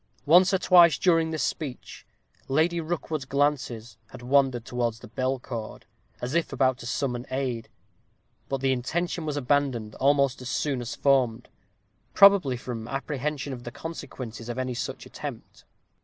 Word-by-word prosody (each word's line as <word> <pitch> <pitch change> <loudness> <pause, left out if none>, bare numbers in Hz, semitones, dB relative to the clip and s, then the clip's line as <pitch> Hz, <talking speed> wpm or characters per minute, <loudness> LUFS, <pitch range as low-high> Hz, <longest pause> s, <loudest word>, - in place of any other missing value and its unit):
Once 180 +5 +6
or 190 - +3
twice 175 -3 +6
during 165 -3 +3
this 160 -1 -2
speech 140 -6 -5 0.4
Lady 165 +5 +2
Rookwood's 160 -3 -3
glances 130 -5 -1
had 120 - -11
wandered 130 -2 +2
towards 120 -2 -2
the - - -12
bell 130 +4 -1
cord, 115 -3 -7 0.3
as 125 +3 -4
if 170 0 0
about 130 -1 +1
to 120 - -7
summon 125 -1 -2
aid; 130 -3 -3 0.8
but 135 -1 -2
the 135 0 +2
intention 160 +6 -2
was 150 -1 -2
abandoned 130 -5 0
almost 140 -1 +2
as 125 - -6
soon 135 -3 -1
as 120 - -5
formed, 125 -4 +1 0.7
probably 195 -11 +6
from 120 -2 -6
apprehension 140 +1 -3
of 120 -1 -8
the 120 - -5
consequences 120 -6 -7
of 120 - -4
any 130 -1 -2
such 120 - -5
attempt. - - -9
135 Hz, 155 wpm, -26 LUFS, 125-150 Hz, 0.8 s, Once